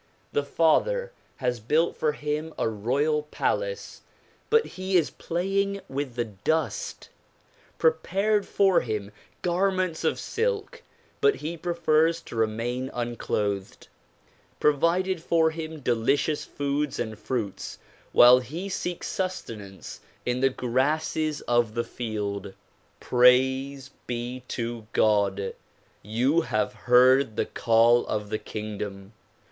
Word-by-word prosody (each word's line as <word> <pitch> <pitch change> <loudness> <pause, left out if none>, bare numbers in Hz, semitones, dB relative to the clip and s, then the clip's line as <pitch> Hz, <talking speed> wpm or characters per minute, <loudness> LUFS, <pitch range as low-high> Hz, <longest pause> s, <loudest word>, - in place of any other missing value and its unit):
The 145 - +1
Father 485 - +2 0.2
has 125 -2 -1
built 150 +10 +1
for 150 -1 0
him 150 +2 -3
a - - +1
royal 135 +8 0
palace - - -2 0.5
but 455 0 +4
he 185 0 0
is 165 - +1
playing 195 +3 -1
with 135 -2 -4
the 120 -1 0
dust; 115 +5 -2 0.7
prepared 195 +6 +1
for 195 -2 +4
him 105 -3 -4 0.3
garments 185 -1 0
of - - +1
silk 470 +1 -2 0.4
but 425 -1 +5
he 160 +3 -5
prefers 165 -1 +2
to - - -10
remain 115 +4 -1
unclothed; 105 -5 -3 0.7
provided 170 +5 +2
for 160 -1 +3
him 160 -1 -6
delicious 135 +5 +1
foods 145 0 -2
and 110 -2 -4
fruits 110 -2 -4 0.3
while 125 +1 +8
he 165 +10 -6
seeks 180 -2 -3
sustenance 115 - -5 0.3
in 125 0 0
the 135 +1 +4
grasses 150 +5 0
of 120 -2 +1
the 120 - 0
field. 105 -4 -4 0.4
Praise 130 +2 +3 0.2
be 120 +1 -4
to 115 -2 -4
God! 100 -2 +2 0.5
you 125 - +1
have 110 - 0
heard 125 -1 +4
the - - 0
call 115 +1 +4
of 105 -1 -3
the 110 - -1
kingdom. 105 -1 -6
135 Hz, 115 wpm, -26 LUFS, 115-165 Hz, 0.7 s, while